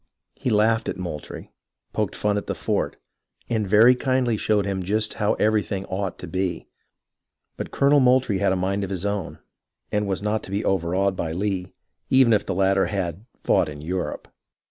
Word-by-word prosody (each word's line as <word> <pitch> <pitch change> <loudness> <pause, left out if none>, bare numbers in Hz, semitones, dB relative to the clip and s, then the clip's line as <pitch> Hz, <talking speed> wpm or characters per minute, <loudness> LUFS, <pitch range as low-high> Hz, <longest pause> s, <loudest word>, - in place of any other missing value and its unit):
He - - -3
laughed 110 +1 +2
at - - -3
Moultrie, 85 -5 -7 0.4
poked - - -1
fun 105 -1 0
at 105 - -3
the - - -2
fort, - - -1 0.5
and 110 -3 0
very 110 +5 +7
kindly 130 -2 +1
showed 105 -1 +1
him 95 -1 -2
just 105 +4 0
how 105 - +2
everything 105 -2 0
ought 95 -1 -3
to 90 - -8
be; 95 +1 -2 0.9
but - - -5
Colonel 140 +1 +4
Moultrie 125 -6 +3
had 100 -1 +2
a - - +2
mind 95 +2 -1
of 95 - -4
his 95 -1 -4
own, 100 -3 -2 0.5
and 105 0 0
was 95 0 -2
not 105 +1 0
to - - -11
be 100 +2 -2
overawed 95 +1 +1
by 80 -3 -3
Lee, 95 0 -2 0.4
even 130 -3 +5
if 105 - +3
the 95 - -1
latter 95 0 +3
had 95 -1 -3 0.2
fought - - +2
in 75 -1 -8
Europe. 90 +5 -4
100 Hz, 185 wpm, -24 LUFS, 95-110 Hz, 0.9 s, very